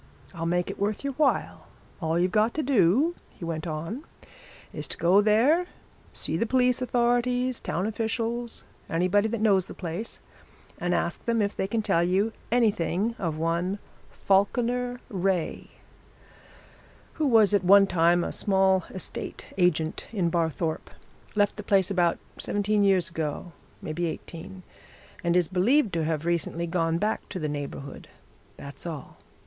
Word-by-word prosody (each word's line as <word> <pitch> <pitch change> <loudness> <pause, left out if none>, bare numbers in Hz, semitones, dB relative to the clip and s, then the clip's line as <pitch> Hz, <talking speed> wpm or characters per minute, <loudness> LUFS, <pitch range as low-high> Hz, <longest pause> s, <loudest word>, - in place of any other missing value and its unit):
I'll 165 -2 -3
make 175 +1 0
it - - -11
worth 205 +4 -1
your 280 -1 -2
while. 290 +1 0 0.3
All 160 0 0
you've 180 +1 +2
got 215 +2 +2
to 310 - 0
do,' 255 - +3 0.2
he 170 - -9
went 165 0 -4
on, 165 - -4 0.7
'is - - -5
to - - -5
go 185 +4 +5
there 250 - +3 0.4
see - - -3
the 230 - 0
police 250 0 +2
authorities, 245 0 +1
town 180 +4 -2
officials, 230 +2 -2 0.3
anybody 185 +4 +2
that 230 0 -3
knows 195 -4 +3
the - - -9
place, 180 +5 -5 0.6
and 175 0 0
ask 170 - -2
them 235 -1 +1
if 205 -1 0
they 190 - -1
can 220 +2 -1
tell 170 -4 +2
you 195 +5 +1 0.2
anything 215 -2 +1
of 165 -5 -2
one 170 +4 0 0.3
Falkiner 245 +5 +1
Wraye, 190 -5 -1 1.5
who 300 - +3
was 220 -5 +5
at 200 -2 +3
one 195 +2 +7
time 175 -1 +3
a - - -3
small 190 -2 +2
estate 185 - -7
agent 165 -4 +1
in 180 -7 0
Barthorpe, 165 -1 -1 0.5
left 205 0 +2
the - - -4
place 195 -1 +2
about 175 -3 +2 0.2
seventeen 205 0 +1
years 190 -3 +3
ago 160 +2 -4 0.3
maybe 170 +2 -2
eighteen 170 +3 -8 0.6
and 170 0 +2
is 175 -2 +3
believed 205 - +2
to 165 -2 0
have 160 0 -2
recently 170 0 -1
gone 165 -1 0
back 210 +5 -2
to 190 - -5
the 155 -4 -2
neighbourhood. 145 -1 -6 0.5
That's 140 +4 -7
all. 155 -5 -7
190 Hz, 155 wpm, -27 LUFS, 170-225 Hz, 1.5 s, one